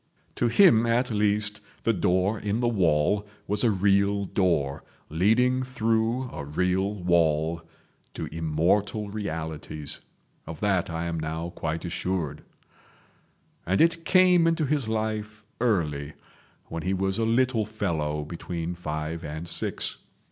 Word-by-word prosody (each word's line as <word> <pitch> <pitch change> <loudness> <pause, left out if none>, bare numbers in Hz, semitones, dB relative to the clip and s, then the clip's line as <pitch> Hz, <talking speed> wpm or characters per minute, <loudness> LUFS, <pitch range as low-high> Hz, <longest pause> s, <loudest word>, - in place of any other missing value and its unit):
To 120 - +1
him 120 - +6
at 120 +2 +1
least 105 0 +1 0.2
the 115 - +3
Door 95 +2 +1
in 105 +2 -1
the 120 - +1
Wall 95 -1 +2 0.2
was 105 +3 0
a 120 - +5
real 100 0 +2
door 85 -8 0 0.3
leading 115 +10 +3
through 115 -1 0
a 75 - -6
real 90 +7 0
wall 85 -3 +1 0.5
to - - -3
immortal 95 +6 0
realities. 80 -6 -4 0.5
Of 80 -1 -7
that 95 -4 +1
I 85 0 -3
am 85 -1 -2
now 80 +2 -4
quite 80 +1 -4
assured. 85 -4 -2 1.2
And 95 +2 0
it 165 0 +3
came 180 -2 +5
into 165 -2 +2
his 140 -5 0
life 110 -1 -3 0.2
early, 80 -11 0 0.5
when 85 - -5
he 95 +3 0
was 95 +2 -1
a - - +2
little 115 -1 +2
fellow 80 -8 -2
between 85 +1 -4
five 80 -1 -4
and 80 +2 -6
six. 85 - -2
95 Hz, 135 wpm, -26 LUFS, 80-110 Hz, 1.2 s, him